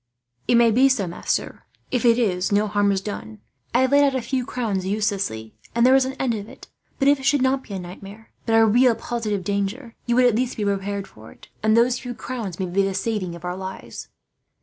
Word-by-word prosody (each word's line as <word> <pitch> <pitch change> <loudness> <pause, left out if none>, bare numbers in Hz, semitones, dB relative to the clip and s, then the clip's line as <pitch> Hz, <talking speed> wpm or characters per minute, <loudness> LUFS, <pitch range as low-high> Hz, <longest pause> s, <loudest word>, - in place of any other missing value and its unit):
"It - - +4
may 235 -1 +5
be 260 +5 +5
so, 235 -7 +1
master. 170 - -3 0.3
If 250 -1 0
it 230 -1 +5
is, 190 -6 0
no 205 +1 +3
harm 205 0 +2
is 195 -1 0
done. 110 - -7 0.3
I 245 - +3
have 260 0 +2
laid 285 0 +6
out 275 -2 +2
a 260 - 0
few 250 +1 -2
crowns 215 -7 -2
uselessly, 195 - -2 0.2
and 235 +1 +4
there 260 - +6
is 265 -1 +5
an 265 - -4
end 255 -3 0
of 210 -1 -6
it. - - -14 0.3
But 275 - +1
if 285 0 +5
it 265 - -8
should 280 -2 +3
not 265 +1 +2
be 205 - -8
a - - -3
nightmare, 195 +5 -11 0.2
but 225 - +3
a 225 0 +6
real 240 +2 +4
positive 215 -6 -3
danger, 200 +6 -3
you 240 - +2
would 250 0 +5
at 245 - +4
least 250 +3 -1
be 215 - -2
prepared 200 0 -2
for 110 +1 -15
it; - - -18
and 220 +1 +3
those 240 +1 +3
few 245 -2 -6
crowns 225 -9 -6
may 190 - -1
be 185 +2 0
the 195 -1 -1
saving 195 -7 -2
of 170 - -10
our 180 0 -3
lives." 190 0 -8
220 Hz, 240 wpm, -23 LUFS, 195-250 Hz, 0.3 s, laid